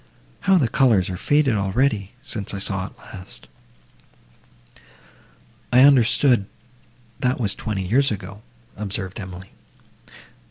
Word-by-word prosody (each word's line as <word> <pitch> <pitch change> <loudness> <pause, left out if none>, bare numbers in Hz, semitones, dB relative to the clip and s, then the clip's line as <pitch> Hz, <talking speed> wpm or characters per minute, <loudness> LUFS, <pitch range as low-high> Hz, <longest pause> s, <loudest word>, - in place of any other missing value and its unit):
How 190 - +6
the 140 -8 +2
colours 115 -7 +2
are - - -4
faded 145 +6 +2
already!—since 105 0 -2
I - - -4
saw 95 -1 -2
it - - -17
last!" 90 -2 -12 2.2
"I 125 - +6
understood, 130 -4 +4 0.7
that 130 0 0
was 105 -5 +1
twenty 105 -4 -4
years 135 +9 +3
ago," 100 0 -6 0.3
observed 100 -2 -4
Emily. 95 -1 -9
105 Hz, 110 wpm, -22 LUFS, 95-130 Hz, 2.2 s, How